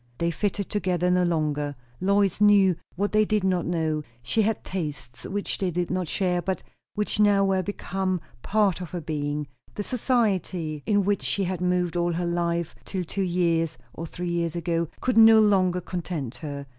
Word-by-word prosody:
They 170 0 0
fitted 200 +3 -2
together 180 -3 0
no 180 0 +3
longer. 150 -4 0 0.2
Lois 200 +1 +2
knew 200 -3 +6 0.2
what 205 +3 -1
they 215 0 +4
did 215 -1 0
not 185 -3 +1
know; 160 -3 0 0.2
she 130 - +1
had 220 0 0
tastes 145 -9 -5
which 205 +1 -3
they 190 - 0
did 175 0 -2
not 185 -1 -1
share, 180 0 0
but 190 +2 -3 0.3
which 210 0 -1
now 205 -1 +5
were 190 -1 +2
become 190 -1 -2 0.2
part 200 -4 +1
of 180 - -6
her 180 - -4
being; 150 -2 -3 0.3
the 205 - -3
society 195 - 0
in 205 -2 +3
which 205 0 +1
she 200 - 0
had 180 -1 -2
moved 180 -1 +1
all 175 0 +1
her 175 +1 -1
life 170 -1 -1
till 185 -2 -3
two 190 +4 -3
years, 170 -3 +1 0.2
or 165 - -6
three 175 +2 -5
years, 170 -1 -1
ago, 170 -1 -1
could 250 -3 +3
no 225 0 +9
longer 190 -4 +3
content 170 -8 -4
her. 140 -2 -6
180 Hz, 180 wpm, -26 LUFS, 170-200 Hz, 0.3 s, no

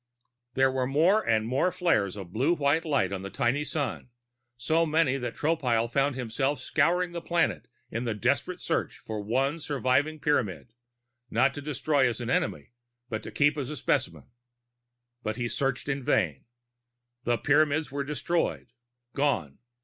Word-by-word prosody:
There 135 0 +4
were 130 -1 0
more 165 +10 +4
and 110 -1 +2
more 130 +10 +1
flares 105 - +1
of 95 -3 -9
blue 140 +10 +2
white 150 +2 +1
light 120 - +1
on 95 - -3
the 100 - -6
tiny 120 +8 0
sun 145 -3 -3 0.5
so 160 +7 +2
many 155 -4 +2
that 125 -3 -4
Tropile 130 -8 +1
found 135 +3 +1
himself 130 +3 -1
scouring 175 +6 +1
the 170 0 -5
planet 170 0 0 0.2
in 115 +2 -3
a 115 - -1
desperate 105 - 0
search - - -2
for 110 -1 -5
one 135 +9 0
surviving 145 +1 0
Pyramid 110 - -1 0.6
not 135 +1 +3
to 145 - -6
destroy 145 -2 +1
as 115 - -4
an 120 +1 -3
enemy, - - -1 0.4
but 110 -3 -3
to - - -8
keep 145 0 +3
for 145 - -3
a 140 +3 -5
specimen. 135 -1 -1 1.0
But 110 -1 -3
he 120 0 -2
searched 135 +2 -1
in 140 -1 -2
vain. 80 - +1 0.8
The 120 -1 +1
Pyramids 150 +3 +2
were 140 0 -2
destroyed, 150 -1 -2 0.4
gone. 120 - 0
135 Hz, 160 wpm, -28 LUFS, 115-150 Hz, 1.0 s, There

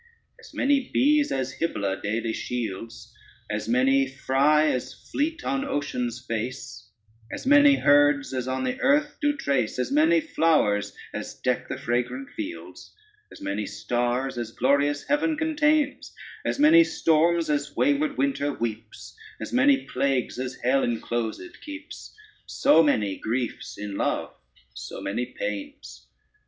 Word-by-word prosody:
As - - -15
many 275 -2 +1
bees 295 +2 +3
as 135 0 -3
Hybla 100 -12 -2
daily 110 +2 -2
shields, 115 -1 -5 0.4
As 105 +1 -3
many 135 +3 +3
fry 140 +3 +2
as 130 -2 -1
fleet 320 +4 -3
on 265 +1 -1
ocean's 125 - -3
face, 120 0 -5 0.4
As - - -6
many 290 +1 +6
herds 145 - +3
as 130 -1 -3
on 130 0 -2
the 130 -1 -2
earth 295 +3 +2
do 290 0 +1
trace, 135 - -1
As 125 - -2
many 315 +4 +4
flowers 155 - +1 0.2
as - - -6
deck - - -1
the - - -3
fragrant 125 +2 -2
fields, 320 +1 -8 0.4
As - - -13
many 100 +1 -3
stars 120 +1 -2
as 120 -2 -4
glorious 140 +4 +1
heaven 300 +2 0
contains, 305 -2 +1 0.3
As - - -1
many 315 +3 +7
storms 165 - +2
as 145 0 -2
wayward 290 +1 +1
winter 270 - 0
weeps, 115 -4 -6 0.2
As - - -7
many 270 +2 +4
plagues 130 -2 -1
as 130 0 -4
hell 135 +2 +3
enclosèd 120 - -3
keeps, 295 0 -10 0.3
So 275 - +4
many 105 -11 +1
griefs 120 +2 -4
in 105 -1 -5
love, - - -1 0.4
so - - -8
many 115 +5 -3
pains. 100 - -7
135 Hz, 140 wpm, -25 LUFS, -, 0.4 s, many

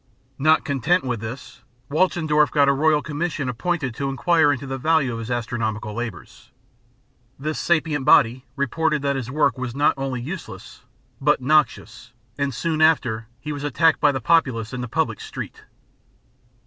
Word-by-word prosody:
Not 155 +3 +3
content 145 +6 +1
with 125 -3 -2
this, 115 +4 -8 0.3
Walchendorf 155 -2 +2
got 145 -2 +3
a 140 - +4
Royal 150 +1 +2
Commission 150 -2 -3
appointed 135 +2 -2
to 135 +4 -3
inquire 145 +3 +3
into 140 0 -3
the 135 0 -5
value 150 -3 +2
of 115 - -5
his 115 +1 -6
astronomical 110 -3 -3
labours. 115 0 -7 0.9
This 155 +3 -3
sapient 155 -4 0
body 125 -2 +4
reported 150 +2 0
that 140 0 0
his 130 -3 -4
work 145 -1 +1
was 125 -1 -4
not 145 +1 +3
only 135 -2 -3
useless, 160 +8 -8 0.4
but 145 +2 +3
noxious; 135 -4 0 0.2
and 140 0 -1
soon 155 +5 -2
after 120 -8 +2
he 150 +4 -6
was 145 -1 -5
attacked 160 +2 +2
by 145 - +4
the 135 - -3
populace 125 -5 +1
in 125 - -4
the 125 - -4
public - - -1
street. - - -8
140 Hz, 160 wpm, -22 LUFS, 125-155 Hz, 0.9 s, a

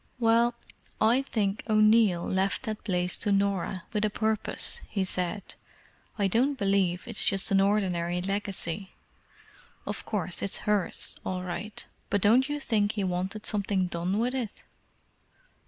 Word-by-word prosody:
"Well, 235 0 +3 0.4
I 230 +4 +4
think 210 -6 -1
O'Neill 215 -4 +4
left 190 +4 0
that 215 -3 -4
place 180 -2 -1
to 205 - -1
Norah 195 -2 0
with 210 -1 0
a 215 - +2
purpose," 220 0 0
he 195 - -1
said. 185 +1 -2 0.6
"I 200 -2 +2
don't 260 +8 +1
believe 195 -4 +1
it's 230 -4 +5
just 195 0 +2
an 195 0 +5
ordinary 180 -4 +1
legacy. 195 -1 -3 0.9
Of - - -4
course, 185 -5 -2
it's 200 - -1
hers, 205 -4 0
all 185 -1 -3
right; 185 +4 -5 0.2
but 205 - +2
don't 240 +8 +4
you 295 0 -2
think 215 -6 +1
he 205 -2 -2
wanted 190 +3 -3
something 200 -3 0
done 175 +2 -2
with 240 +3 0
it?" 245 -6 -4
200 Hz, 145 wpm, -28 LUFS, 185-220 Hz, 0.9 s, it's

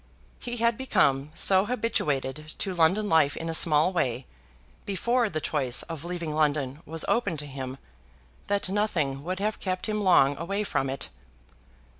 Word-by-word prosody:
He 240 0 -5
had 235 +1 +1
become 140 - +2
so 190 0 +4
habituated 155 - -1
to 195 - -3
London 180 +5 +3
life 160 -5 +3
in 165 - -4
a - - -2
small 160 +2 +4
way, 130 -7 -1 0.6
before 235 +4 0
the 155 - -2
choice 140 -5 0
of 165 -3 -7
leaving 170 -3 -4
London 150 -2 0
was 160 +1 -2
open 200 -9 +1
to 150 - -4
him, 130 -2 -6 0.7
that 200 -1 +1
nothing 170 -9 -1
would 185 +3 -3
have 210 +2 -2
kept 185 -1 -3
him 210 -1 -1
long 145 -8 +5
away 195 +5 -2
from 135 -9 -1
it. 135 - -5
165 Hz, 160 wpm, -27 LUFS, 145-200 Hz, 0.7 s, long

